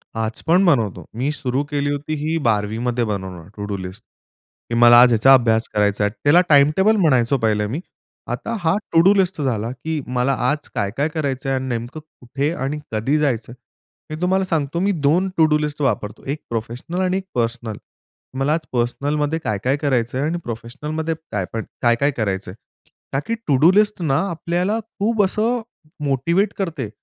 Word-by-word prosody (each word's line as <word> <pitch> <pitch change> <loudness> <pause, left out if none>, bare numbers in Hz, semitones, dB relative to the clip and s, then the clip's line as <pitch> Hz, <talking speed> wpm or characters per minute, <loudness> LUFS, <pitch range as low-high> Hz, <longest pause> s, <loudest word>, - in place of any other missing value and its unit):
आज 110 0 -3
पण 180 +4 +4
बनवतो. 115 - +1
मी 130 +5 -1
सुरु 135 -2 -2
केली 145 -1 0
होती 145 +2 -3
ही 160 +1 0
12वीमध्ये 115 +3 0
बनवणं 95 -5 -5
टु-डू 100 -1 -4
लिस्ट 95 +3 -7 0.7
की 120 - -1
मला 120 0 +8
आज 125 0 +6
याचा 125 +5 +6
अभ्यास 115 -3 +3
करायचा 105 0 +1
आहे. 105 - 0
त्याला 150 +5 +6
टाइम 145 0 +6
टेबल 210 +3 +4
म्हणायचो 135 - +3
पहिलं 105 -2 +1
मी. 135 +8 -3 0.5
आता 230 - -3
हा 160 0 +2 0.2
टु-डू 170 +5 +6
लिस्ट 185 -4 +1
झाला 115 -5 -1
की 155 +5 -4 0.2
मला 125 +2 +2 0.2
आज 150 0 -3
काय-काय 115 +10 -1
करायचं 140 -4 -3
आहे? 135 - +1
आणि 130 - -5
नेमकं 120 +4 -4
कुठे 145 -1 -4
आणि 150 -2 -3
कधी 115 +8 +1
जायचंय? 120 -6 -1 0.6
मी 155 - -4
तुम्हाला 190 +2 +2
सांगतो 160 -3 -1
मी 195 +3 +2 0.2
2 180 +6 +3
टु-डू 155 -2 +4
लिस्ट 150 0 -3
वापरतो. 105 -6 -1
एक 145 +3 -3
प्रोफेशनल 120 +10 -4
आणि 185 0 +1
एक 195 - -5
पर्सनल. 115 -2 -2 0.6
मला 140 +3 +2
आज 165 0 -2
पर्सनलमध्ये 145 +6 0
काय-काय 110 +7 0
करायचंय? 130 -4 0
आणि 160 +4 -1
प्रोफेशनलमध्ये 150 +8 -4 0.2
काय 100 -3 -1
पण 115 -1 -3 0.2
काय-काय 120 +4 +3
करायचंय? 95 -4 -2 0.6
का 135 - +1
की 230 - 0
टु-डू 150 +4 +5
लिस्ट 210 0 +2
ना, 140 -5 +1
आपल्याला 175 +5 -1
खूप 220 0 -1
असं 225 +5 0 0.4
मोटिवेट 170 +9 +1
करते 160 - -3
140 Hz, 170 wpm, -21 LUFS, 115-160 Hz, 0.7 s, मला